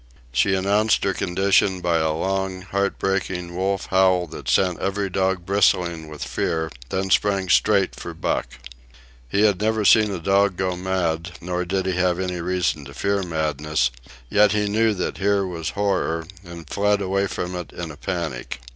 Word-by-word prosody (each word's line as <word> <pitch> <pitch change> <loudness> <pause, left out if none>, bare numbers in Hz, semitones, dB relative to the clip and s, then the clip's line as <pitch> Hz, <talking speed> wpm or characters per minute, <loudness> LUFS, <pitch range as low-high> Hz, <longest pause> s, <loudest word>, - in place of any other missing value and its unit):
She 95 +10 +2
announced 100 +3 +2
her 95 - +1
condition 95 +2 +2
by 85 -2 +1
a 80 0 +1
long, 95 +3 -2
heartbreaking 95 -2 -2
wolf 95 +1 -1
howl 95 -1 +4
that 70 -5 -7
sent 90 +7 +2
every 100 0 -2
dog 95 -1 0
bristling 90 -4 +2
with 75 -3 -7
fear, 80 +5 -2 0.2
then 95 0 -2
sprang 100 -2 +2
straight 100 -1 +3
for - - -8
Buck. - - -1 0.8
He 100 - +1
had 100 -3 +3
never 110 0 +1
seen 110 0 +6
a 100 - -3
dog 95 +2 +2
go 95 -1 -1
mad, 90 -2 -2
nor 90 +1 -3
did 95 +1 -1
he 95 - 0
have 90 -1 +1
any 90 -2 -2
reason 90 -4 -1
to 70 -1 -11
fear 100 +4 0
madness; 75 -6 -1 0.4
yet 105 - +4
he 105 0 +1
knew 110 +1 +2
that 90 - -3
here 100 0 +2
was 85 -3 -4
horror, 95 -5 0 0.2
and 85 -3 -10
fled 105 +3 +1
away 100 0 0
from 90 -1 -4
it 90 -1 -6
in 85 -2 -6
a - - -10
panic. 80 -9 -4
95 Hz, 175 wpm, -23 LUFS, 85-100 Hz, 0.8 s, seen